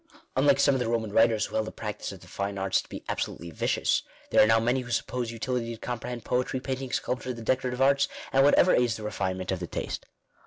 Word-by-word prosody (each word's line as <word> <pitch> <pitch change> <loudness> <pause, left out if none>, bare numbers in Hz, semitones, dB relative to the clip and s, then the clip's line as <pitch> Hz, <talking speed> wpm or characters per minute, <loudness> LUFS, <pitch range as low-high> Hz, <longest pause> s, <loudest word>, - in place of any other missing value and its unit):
Unlike 140 +1 +4
some 140 0 +5
of 135 - +1
the 125 - -1
Boman 115 -3 -1
writers 115 -1 +4
who - - -11
held 110 - 0
the - - -5
practice 105 -2 -5
of - - -11
the - - -14
fine 100 0 -3
arts 95 -1 +1
to - - -19
be - - -7
absolutely 85 0 -3
vicious, - - +1 0.3
there - - +6
are 105 - +6
now 110 0 +5
many 120 +3 +1
who 125 -1 -7
suppose 120 0 -1
utility 115 0 -2
to - - -17
comprehend 120 -1 -5
poetry, 125 +1 0
painting, 130 0 -4
soulpture, 125 0 -2
the 115 - -8
decorative 130 +1 +1
arts, 140 +1 +4 0.3
and 135 0 +5
whatever 145 +5 +5
aids 120 -2 +2
the 110 - -8
refinement 95 -3 -2
of 95 - -1
the 90 - -4
taste. - - -4
115 Hz, 235 wpm, -28 LUFS, 110-130 Hz, 0.3 s, there